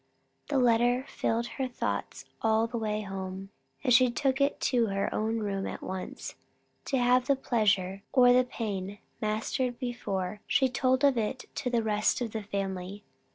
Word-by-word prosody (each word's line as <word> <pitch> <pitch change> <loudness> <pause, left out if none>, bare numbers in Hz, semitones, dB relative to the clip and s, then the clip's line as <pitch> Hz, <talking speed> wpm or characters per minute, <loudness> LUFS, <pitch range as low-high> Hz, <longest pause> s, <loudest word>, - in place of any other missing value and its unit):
The 285 - +1
letter 245 +1 +3
filled 230 +1 -1
her 265 +2 -3
thoughts 245 - -3 0.2
all 220 0 +3
the 235 0 -4
way 215 -1 -1
home; 190 -1 -6 0.3
and 255 -3 +3
she 250 +1 +6
took 270 +2 0
it 280 +1 +2
to 240 -3 +2
her 195 -1 -1
own 220 +1 0
room 195 -2 -2
at - - -6
once, 185 0 -5 0.5
to 270 - 0
have 250 +1 +3
the 280 - +4
pleasure, 205 -7 +1
or 245 -2 +6
the 255 +1 +5
pain, 205 -5 -4 0.2
mastered 230 +3 -1
before 210 -5 -3
she 265 -1 +3
told 255 +1 +1
of 275 -4 +4
it 225 +4 -3
to 260 - -2
the 235 -2 +1
rest 215 -1 +1
of 240 -3 -3
the 220 - -3
family. 195 0 -4
230 Hz, 170 wpm, -29 LUFS, 200-250 Hz, 0.5 s, she